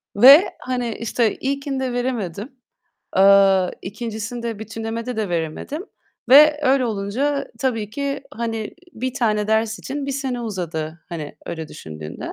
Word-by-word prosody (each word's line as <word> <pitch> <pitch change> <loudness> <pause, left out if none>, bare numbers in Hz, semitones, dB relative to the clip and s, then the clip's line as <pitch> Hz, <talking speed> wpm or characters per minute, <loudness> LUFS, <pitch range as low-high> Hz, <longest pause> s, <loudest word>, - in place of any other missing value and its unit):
ve, 275 - +8
hani, 245 -3 -2
işte, 230 -1 0
ilkinde 270 -2 -2
veremedim, 235 - -3 0.7
eee, 195 -1 +6
ikincisinde, 225 +2 -5
bütünlemede 225 +2 -5
de 215 -3 -1
veremedim 170 - -3 0.4
ve 300 +3 +8
öyle 265 -1 +3
olunca 240 +7 -1
tabii 225 -6 -1
ki, 280 +2 -3
hani, 225 -3 -4 0.2
1 255 +2 -4
tane 215 -5 +1
ders 220 0 +1
için 275 +1 -5
1 275 - -2
sene 260 -3 -3
uzadı. 170 -7 -4
Hani 155 -4 -6
öyle 160 -2 -5
düşündüğünde. 80 - -8
225 Hz, 125 wpm, -21 LUFS, 200-260 Hz, 0.7 s, ve